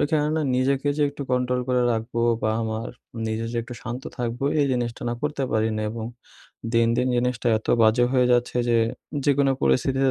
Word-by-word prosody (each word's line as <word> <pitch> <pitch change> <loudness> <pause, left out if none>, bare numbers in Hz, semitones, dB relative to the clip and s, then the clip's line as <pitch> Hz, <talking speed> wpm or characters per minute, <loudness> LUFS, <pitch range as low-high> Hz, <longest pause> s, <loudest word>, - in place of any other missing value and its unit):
ওইখানে 150 0 +1
না 160 - +1
নিজেকে 135 +2 +1
যে 150 - +1
একটু 140 0 -6
control 125 0 +1
করে 125 -1 +2
রাখবো 115 +1 -2 0.2
বা 110 - +2
আমার 110 +1 -3 0.4
নিজে 110 +1 -2
যে - - -3
একটু 120 +1 -9
শান্ত 120 +3 -5 0.2
থাকবো 120 +2 -2 0.2
এই 145 - +3
জিনিসটা 120 -2 -2
না 120 - -1
করতে 150 -1 -2
পারি 110 0 +2
না 110 - -2
এবং 115 0 -5 0.7
দিন, 115 -1 +4
দিন 125 - +1
জিনিসটা 125 0 -1
এত 110 - -14
বাজে 110 +2 +4
হয়ে 125 -2 +4
যাচ্ছে 120 0 +1
যে, 120 - +4 0.5
যেকোনো 140 -1 +3
পরিস্থিতিতে 135 - +2
125 Hz, 190 wpm, -24 LUFS, 115-135 Hz, 0.7 s, দিন